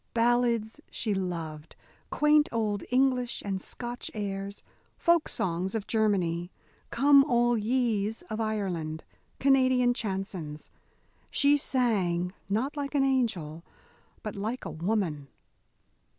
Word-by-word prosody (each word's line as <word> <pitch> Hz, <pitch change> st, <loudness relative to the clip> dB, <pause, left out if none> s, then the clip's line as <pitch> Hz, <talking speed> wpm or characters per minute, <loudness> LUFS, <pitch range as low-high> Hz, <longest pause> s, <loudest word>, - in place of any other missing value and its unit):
Ballads 235 Hz, -1 st, +1 dB
she 215 Hz, -3 st, -1 dB
loved, 165 Hz, -5 st, -4 dB, 0.3 s
quaint 300 Hz, 0 st, +4 dB
old 215 Hz, -3 st, -1 dB
English 250 Hz, -1 st, +1 dB
and 195 Hz, -2 st, -2 dB
Scotch 240 Hz, +3 st, -5 dB
airs, 200 Hz, -1 st, -4 dB, 0.3 s
folk 340 Hz, -1 st, +3 dB
songs 185 Hz, +3 st, -1 dB
of 215 Hz, -2 st, -2 dB
Germany, 180 Hz, -6 st, +1 dB, 0.4 s
"Come 280 Hz, +2 st, +6 dB
all 240 Hz, -3 st, +2 dB
ye's" 225 Hz, -2 st, 0 dB
of 220 Hz, 0 st, -4 dB
Ireland, 180 Hz, -8 st, -2 dB, 0.4 s
Canadian 255 Hz, -2 st, +4 dB
chansons. 190 Hz, -8 st, -4 dB, 0.6 s
She 285 Hz, +1 st, +4 dB
sang 195 Hz, -11 st, 0 dB, 0.2 s
not 245 Hz, +9 st, 0 dB
like 285 Hz, 0 st, -4 dB
an 275 Hz, -, +4 dB
angel, 195 Hz, -, 0 dB, 0.6 s
but 215 Hz, -, -5 dB
like 220 Hz, +5 st, -4 dB
a -, -, -4 dB
woman. 165 Hz, -5 st, -1 dB
220 Hz, 110 wpm, -28 LUFS, 190-250 Hz, 0.6 s, Come